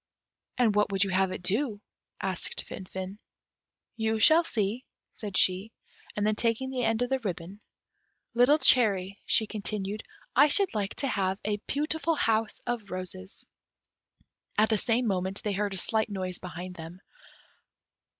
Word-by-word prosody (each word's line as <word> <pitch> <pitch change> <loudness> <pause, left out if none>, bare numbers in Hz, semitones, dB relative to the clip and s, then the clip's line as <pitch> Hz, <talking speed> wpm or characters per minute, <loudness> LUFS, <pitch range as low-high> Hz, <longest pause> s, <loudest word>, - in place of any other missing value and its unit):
"And 235 -4 +3
what 210 0 +2
would 195 0 +3
you 195 - -2
have 190 0 +2
it 180 - -6
do?" 210 +3 +1 0.4
asked 190 -2 -2
Finfin. 190 +2 -7 0.8
"You 220 -1 0
will 315 +10 +6
see," 220 -3 -2 0.3
said 205 -3 -4
she; 190 +4 +3 0.4
and 205 - 0
then 215 - +3
taking 230 +4 0
the 255 -2 -2
end 225 +1 +1
of 245 - -4
the 265 - +2
ribbon, 190 -2 -5 0.7
"Little 245 +5 +5
cherry," 200 -8 +3
she 220 - +3
continued, 210 -1 -3 0.3
"I 285 +4 +7
should 385 +6 +3
like 205 -2 -2
to 275 - -1
have 190 -5 0
a 210 -1 0
beautiful 315 +3 0
house 225 -5 0
of 235 -4 -3
roses." 185 +1 -6 1.1
At 215 +1 +4
the 220 - +3
same 245 +3 +2
moment 190 -1 -1
they 210 - -1
heard 200 0 -1
a - - -1
slight 220 +4 +1
noise 185 -3 -4
behind 180 0 -7
them. 165 +3 -9
210 Hz, 155 wpm, -28 LUFS, 190-235 Hz, 1.1 s, I